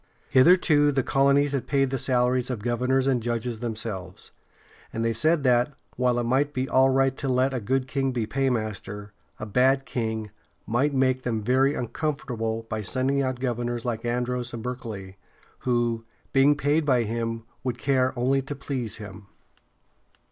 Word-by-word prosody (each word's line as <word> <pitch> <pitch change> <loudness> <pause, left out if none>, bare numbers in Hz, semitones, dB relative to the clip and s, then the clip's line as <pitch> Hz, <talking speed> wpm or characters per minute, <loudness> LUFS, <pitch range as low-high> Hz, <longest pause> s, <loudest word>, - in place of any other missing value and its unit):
Hitherto, 145 0 +5
the 135 -2 +1
colonies 140 +2 +3
had 140 -3 -2
paid 135 -2 +1
the 135 - -1
salaries 125 0 +1
of 115 -5 -4
governors 125 +2 +1
and 130 -3 +2
judges 115 0 -2
themselves, 110 -6 -5 0.6
and 115 0 -2
they 115 - +1
said 155 +6 +2
that, 125 +2 +3 0.2
while 125 -1 +1
it 120 - 0
might 135 +5 +1
be 130 +1 -1
all 130 0 +4
right 135 0 +2
to 135 - -3
let 130 +1 +2
a 130 - -1
good 130 +4 -1
king 135 0 0
be 120 -3 -1
paymaster, 110 -5 -2 0.3
a 110 - -4
bad 130 +5 +2
king 110 -4 -3 0.3
might 120 +7 +1
make 130 -1 +2
them 115 -4 -2
very 130 +5 +3
uncomfortable 120 -3 -3
by 110 -1 -3
sending 135 +5 0
out 130 -2 -2
governors 120 -1 -2
like 115 -2 -2
Andros 120 0 -2
and 115 - -7
Berkeley, 110 -7 -6 0.4
who, 120 -2 0 0.3
being 140 +2 +5
paid 150 +2 +2
by 130 -5 +3
him, 115 0 -3 0.2
would 125 -2 -2
care 130 0 +2
only 135 +3 +2
to 135 +2 -6
please 130 -5 -4
him. 105 -2 -10
125 Hz, 165 wpm, -26 LUFS, 115-135 Hz, 0.6 s, Hitherto